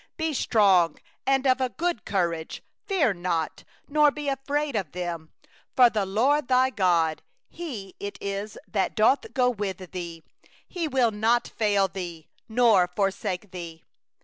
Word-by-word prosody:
6Be 320 Hz, -1 st, -1 dB
strong 195 Hz, -, +3 dB, 0.3 s
and 270 Hz, 0 st, +2 dB
of 255 Hz, -1 st, +1 dB
good 345 Hz, -9 st, -1 dB
courage, 170 Hz, -5 st, -2 dB, 0.2 s
fear 330 Hz, -, +2 dB
not, 175 Hz, -3 st, -2 dB, 0.2 s
nor 300 Hz, 0 st, +4 dB
be 295 Hz, 0 st, -6 dB
affrighted 280 Hz, +1 st, -2 dB
at 190 Hz, -8 st, -2 dB
them; 170 Hz, -3 st, -5 dB, 0.4 s
for 245 Hz, -2 st, +7 dB
the 205 Hz, -3 st, -1 dB
LORD 255 Hz, +8 st, +2 dB
thy 260 Hz, 0 st, +3 dB
God, 170 Hz, -7 st, +2 dB, 0.3 s
He 230 Hz, -, -7 dB
it 200 Hz, -1 st, -6 dB
is 200 Hz, +1 st, -4 dB
that 195 Hz, -3 st, -1 dB
doth 270 Hz, -, +3 dB
go 250 Hz, -2 st, +3 dB
with 195 Hz, -5 st, -5 dB
thee; 170 Hz, -3 st, -6 dB, 0.4 s
He 345 Hz, -3 st, -3 dB
will 255 Hz, -5 st, +2 dB
not 225 Hz, +3 st, +1 dB
fail 205 Hz, -3 st, +2 dB
thee, 175 Hz, -5 st, -7 dB, 0.2 s
nor 220 Hz, -6 st, +4 dB
forsake 195 Hz, 0 st, -2 dB
thee. 170 Hz, -3 st, -8 dB
210 Hz, 145 wpm, -26 LUFS, 180-260 Hz, 0.4 s, for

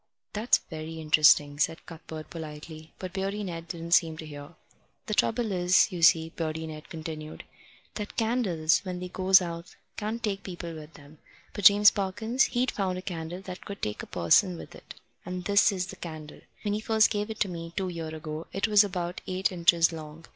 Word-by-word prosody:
"That's 215 Hz, +4 st, +3 dB
very 160 Hz, +1 st, -6 dB
interesting," 150 Hz, -2 st, +4 dB
said 160 Hz, +2 st, 0 dB
Cuthbert 160 Hz, -1 st, -9 dB
politely, 155 Hz, 0 st, -9 dB
but 185 Hz, -1 st, -7 dB
Beardy 195 Hz, +2 st, -2 dB
Ned 170 Hz, -3 st, -6 dB
didn't 170 Hz, -1 st, -6 dB
seem 165 Hz, -2 st, +4 dB
to 155 Hz, -, -7 dB
hear. 145 Hz, +1 st, -10 dB, 0.5 s
"The 215 Hz, -, -3 dB
trouble 225 Hz, +1 st, +1 dB
is, 180 Hz, +2 st, +3 dB
you 175 Hz, -2 st, -5 dB
see," 160 Hz, 0 st, +5 dB
Beardy 160 Hz, -1 st, -3 dB
Ned 155 Hz, 0 st, -9 dB
continued, 155 Hz, -1 st, -7 dB, 0.5 s
"that 210 Hz, -1 st, -6 dB
candles, 210 Hz, -9 st, +2 dB
when 185 Hz, -2 st, -6 dB
they 180 Hz, 0 st, -6 dB
goes 190 Hz, +1 st, +5 dB
out, 170 Hz, 0 st, -7 dB, 0.2 s
can't 220 Hz, +2 st, -4 dB
take 200 Hz, -3 st, -1 dB
people 175 Hz, -2 st, -7 dB
with 155 Hz, 0 st, -11 dB
them. 145 Hz, 0 st, -16 dB, 0.3 s
But 205 Hz, -, -5 dB
James 205 Hz, +1 st, +8 dB
Parkins, 220 Hz, +6 st, 0 dB
he'd 250 Hz, +1 st, 0 dB
found 190 Hz, -3 st, -2 dB
a 185 Hz, -, -7 dB
candle 175 Hz, 0 st, -5 dB
that 185 Hz, -1 st, -8 dB
could 200 Hz, 0 st, -8 dB
take 105 Hz, 0 st, -2 dB
a -, -, -9 dB
person 130 Hz, -, +3 dB
with -, -, -10 dB
it, -, -, -12 dB, 0.3 s
and 180 Hz, 0 st, -5 dB
this 205 Hz, +2 st, +5 dB
is 185 Hz, -2 st, -2 dB
the -, -, -9 dB
candle. 155 Hz, -3 st, -9 dB, 0.2 s
When 205 Hz, -1 st, -1 dB
he 210 Hz, -, -1 dB
first 220 Hz, 0 st, +3 dB
gave 210 Hz, 0 st, -2 dB
it 220 Hz, -1 st, -1 dB
me, 165 Hz, -3 st, -6 dB
two 190 Hz, -2 st, -1 dB
year 165 Hz, -2 st, -5 dB
ago, 155 Hz, 0 st, -6 dB
it 195 Hz, -, 0 dB
was 210 Hz, -1 st, +6 dB
about 180 Hz, -3 st, -4 dB
eight 185 Hz, +1 st, 0 dB
inches 170 Hz, -1 st, +4 dB
long. 155 Hz, 0 st, -9 dB
175 Hz, 195 wpm, -28 LUFS, 160-200 Hz, 0.5 s, James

